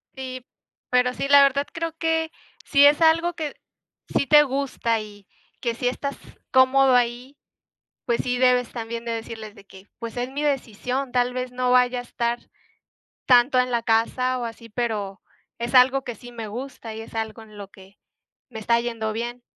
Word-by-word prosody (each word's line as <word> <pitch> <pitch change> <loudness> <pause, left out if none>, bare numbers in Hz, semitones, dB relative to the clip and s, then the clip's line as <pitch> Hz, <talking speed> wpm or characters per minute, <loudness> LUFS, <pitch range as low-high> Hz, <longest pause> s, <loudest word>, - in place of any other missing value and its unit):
Sí, 255 -1 -7 0.4
pero 250 0 +2
sí, 275 - -3
la 285 0 +8
verdad, 280 +1 +2
creo 330 0 -4
que, 325 -1 0 0.3
si 280 0 +5
es 290 +2 +5
algo 335 +2 +4
que 315 -3 -5 0.6
sí 280 - +1
te 295 +2 +7
gusta 265 -4 -1
y 205 -2 -11 0.4
que 235 -2 -1
sí 245 +2 -2
estás 280 +3 -3 0.3
cómodo 260 0 +5
ahí, 245 +3 -1 0.7
pues 235 -1 0
sí, 250 -1 -1
debes 250 -1 +3
también 230 0 -5
de 235 - -3
decirles 225 -1 -6
de 200 -2 -17
que: 190 0 -16
"Pues 230 -1 -6
es 245 +1 -2
mi 285 +2 -4
decisión, 260 -1 -2
tal 245 0 +1
vez 255 0 -4
no 250 0 0
vaya 250 0 +3
a - - -4
estar 240 0 -2 0.9
tanto 250 +1 +5
en 250 0 +1
la 235 -1 +1
casa 250 +3 +1
o 240 - -3
así, 230 0 -9
pero 210 -4 -3 0.4
es 235 +1 -4
algo 260 +1 +5
que 245 - -5
sí 245 +3 -12
me 230 -2 -7
gusta 235 0 -7
y 220 - -7
es 225 - -12
algo 220 0 -4
en 215 -1 -15
lo 200 -2 -9
que 195 0 -18 0.5
me 225 -3 -8
está 235 +2 +2
yendo 230 -2 -3
bien", 240 +2 -5
245 Hz, 185 wpm, -23 LUFS, 230-265 Hz, 0.9 s, la